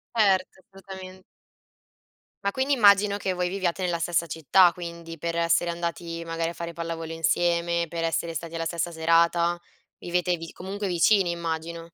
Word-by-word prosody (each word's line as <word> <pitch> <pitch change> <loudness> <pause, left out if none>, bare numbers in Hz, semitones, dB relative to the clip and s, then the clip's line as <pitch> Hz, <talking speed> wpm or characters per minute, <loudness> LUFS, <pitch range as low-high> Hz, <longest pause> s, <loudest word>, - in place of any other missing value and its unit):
Ert 195 -4 +3
assolutamen 190 0 -12 1.2
Ma 200 - +2
quindi, 265 +5 0
immagino 205 -4 +5
che 190 -2 -2
voi 180 0 -1
viviate 185 -1 -2
nella 175 -2 0
stessa 170 0 0
città 165 +3 +4
quindi, 170 -2 -8
per 170 +2 -3
essere 170 +1 +2
andati 170 0 -4
magari 165 0 -2
a 170 - -6
fare 170 0 -6
pallavolo 165 -1 -5
insieme, 170 +1 +1
per 165 +1 -4
essere 165 0 -1
stati 165 +1 -6
alla 165 0 -2
stessa 170 +1 -2
serata, 170 +1 +2 0.4
vivete 180 0 0
vi 165 0 -8
comunque 195 +2 -5
vicini 180 +2 +3
immagino. 165 0 -4
170 Hz, 155 wpm, -26 LUFS, 165-185 Hz, 1.2 s, immagino